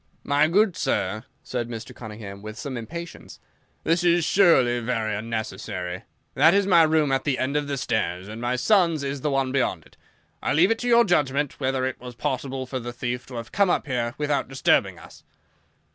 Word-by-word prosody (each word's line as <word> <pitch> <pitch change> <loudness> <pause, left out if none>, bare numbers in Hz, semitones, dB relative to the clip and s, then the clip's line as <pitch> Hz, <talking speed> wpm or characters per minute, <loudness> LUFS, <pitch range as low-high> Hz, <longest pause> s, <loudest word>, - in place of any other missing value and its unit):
"My 145 +2 +3
good 195 +2 +3
sir," 110 - -1 0.2
said 120 -2 -4
Mr. 115 -1 -7
Cunningham 105 -3 -9
with 110 +1 -8
some 130 +2 -5
impatience, 170 +9 -8 0.4
"this 165 +2 +1
is 175 -2 +3
surely 135 -12 +4
very 115 -2 -1
unnecessary. 100 -4 -4 0.3
That 160 +7 +5
is 200 -1 +3
my 180 -4 +6
room 155 -3 +3
at 135 - +1
the 140 -3 0
end 130 +3 -1
of 150 -1 0
the 140 -1 -2
stairs, 100 -7 -2
and 110 +2 -8
my 120 +1 0
son's 170 - +2
is 140 0 -3
the 150 - 0
one 135 -2 0
beyond 110 - -1
it. - - -22 0.4
I - - 0
leave 175 +8 +4
it 225 - 0
to 245 - -3
your 235 0 +6
judgment 145 -6 0
whether 130 -1 0
it 130 - -3
was 125 -1 -9
possible 135 -1 -3
for 130 0 -4
the 120 0 -6
thief 120 +1 -4
to 130 - -9
have 115 -1 -6
come 200 -2 +2
up - - +1
here 120 -3 -2
without 150 -1 0
disturbing 135 0 +2
us." - - -15
130 Hz, 200 wpm, -24 LUFS, 120-155 Hz, 0.4 s, my